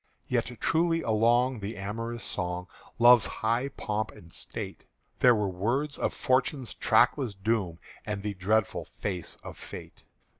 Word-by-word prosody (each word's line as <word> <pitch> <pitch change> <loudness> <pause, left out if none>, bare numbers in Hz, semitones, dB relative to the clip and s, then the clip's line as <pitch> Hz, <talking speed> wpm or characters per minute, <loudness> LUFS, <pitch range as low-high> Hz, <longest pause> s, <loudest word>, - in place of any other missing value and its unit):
Yet 120 0 -1
truly 165 0 +2
along 120 +3 +3
the 105 +2 -5
amorous 115 +4 -4
song 90 -1 -2
Of - - -21
Love's 120 -3 +7
high 115 +4 0
pomp 110 -4 -3
and 85 0 -15
state, - - -6 0.4
There 125 -2 +6
were 105 -2 0
words 120 +11 -1
of - - +1
Fortune's 130 0 0
trackless 125 -8 +3
doom 95 -4 -1 0.3
And 105 -2 -4
the 105 -1 -2
dreadful 105 +3 0
face 90 -4 -5
of - - -9
Fate. - - -9
110 Hz, 145 wpm, -29 LUFS, 100-125 Hz, 0.4 s, Love's